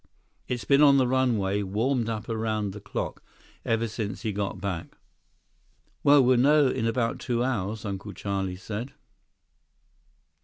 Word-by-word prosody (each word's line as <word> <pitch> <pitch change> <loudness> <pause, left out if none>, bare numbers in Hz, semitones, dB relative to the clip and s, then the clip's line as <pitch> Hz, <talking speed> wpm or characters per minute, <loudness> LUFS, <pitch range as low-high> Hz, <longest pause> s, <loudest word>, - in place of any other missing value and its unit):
It's 125 -2 -3
been 140 +1 +4
on 140 -2 +7
the 130 - +4
runway, 115 -6 +1
warmed 115 +5 0
up 110 -2 -4
around 110 -2 -1
the 105 - -9
clock, 105 - -4 0.4
ever 115 0 0
since 110 0 -5
he 110 - -1
got 100 0 -3
back." 95 -5 -5 1.1
"Well, 145 -1 +6
we'll 125 0 +4
know 145 +2 +5
in 115 - -1
about 115 0 0
two 120 -1 -1
hours," 110 -4 -2
Uncle 100 0 -5
Charlie 95 -2 -3
said. 110 +7 -6
115 Hz, 145 wpm, -27 LUFS, 100-125 Hz, 1.1 s, on